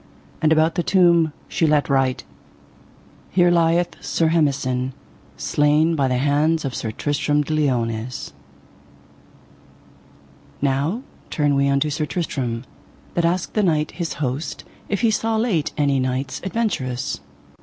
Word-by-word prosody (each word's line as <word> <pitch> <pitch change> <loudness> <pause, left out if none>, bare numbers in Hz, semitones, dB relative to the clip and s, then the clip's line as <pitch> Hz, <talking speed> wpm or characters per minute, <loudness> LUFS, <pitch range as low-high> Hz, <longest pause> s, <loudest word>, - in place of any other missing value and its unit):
And 155 -1 +3
about 160 +1 +4
the 175 - 0
tomb 170 -3 +4 0.2
she 165 - +1
let 150 -1 +3
write: 135 -2 +1 1.1
Here 175 -1 +4
lieth 170 0 +1
Sir 165 -1 +1
Hemison, 135 -5 0 0.4
slain 150 - +2
by 140 -3 +2
the 130 -1 +1
hands 150 +4 +2
of 135 - -3
Sir 115 - -3
Tristram 145 +4 0
de 155 - -3
Liones. 125 -5 -1 2.3
Now 145 - 0 0.3
turn 145 -2 +1
we 140 0 +2
unto 140 +2 +1
Sir 150 +1 -1
Tristram, 135 -6 -3 0.5
that 170 - +1
asked 175 +1 0
the 215 - +2
knight 155 -6 +1
his 170 -3 -4
host 145 +2 -3 0.3
if 200 - -1
he 230 - +3
saw 225 +1 0
late 190 -10 0
any 140 -2 +2
knights 130 +1 -2
adventurous. 140 - -2
150 Hz, 135 wpm, -22 LUFS, 135-170 Hz, 2.3 s, about